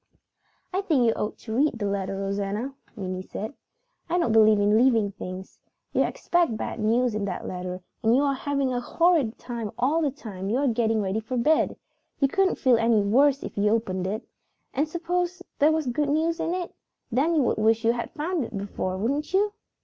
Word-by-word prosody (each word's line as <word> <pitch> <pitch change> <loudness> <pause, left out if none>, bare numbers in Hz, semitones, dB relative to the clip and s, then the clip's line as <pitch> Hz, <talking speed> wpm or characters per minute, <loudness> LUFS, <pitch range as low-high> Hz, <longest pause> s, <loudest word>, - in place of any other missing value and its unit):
"I 380 - +1
think 305 -11 +2
you 225 - +4
ought 210 - -3
to 220 - -7
read 275 -2 +2
your 205 -2 -1
letter, 195 -1 -2
Rosanna," 200 +6 -2 0.2
Minnie 185 -3 -4
said. 215 +5 -6 0.6
"I 350 - +1
don't 335 -10 +1
believe 215 -1 +6
in 205 +1 +3
leaving 225 -4 +4
things. 185 -1 -8 0.3
You - - +3
expect 340 -10 +1
bad - - -4
news 230 +2 +2
in 210 -1 -1
that 185 -3 -4
letter 180 0 -5 0.2
and 225 +1 +4
you 275 - +3
are 280 -1 +2
having 275 -1 -1
a 245 - 0
horrid 320 -4 +2
time 235 -4 -5
all 280 +7 +2
the 300 - +2
time 200 -8 -7
you 230 - +1
are 280 +1 +1
getting 225 -2 +1
ready 195 +3 -1
for 225 +3 -4
bed. 305 +7 +2 0.4
You 275 - +4
couldn't 385 +6 +2
feel 255 -3 +4
any 230 -1 +3
worse 275 +7 +3
if - - -6
you 210 +1 +3
opened 190 -5 0
it. 215 +5 -4 0.5
And 290 +4 +1
suppose 355 +2 -2 0.2
there 300 +2 +5
was 315 -1 0
good 280 +4 0
news 325 +3 +1
in 340 - -1
it? 360 -2 -4 0.4
Then 290 +8 +2
you 295 - +3
would - - +1
wish 225 +1 +2
you 230 - +5
had 235 0 -3
found 325 0 -2
it - - -7
out - - -3
before, 195 -2 -3
wouldn't 285 - -1
you?" 410 +1 +2
235 Hz, 210 wpm, -26 LUFS, 210-295 Hz, 0.6 s, believe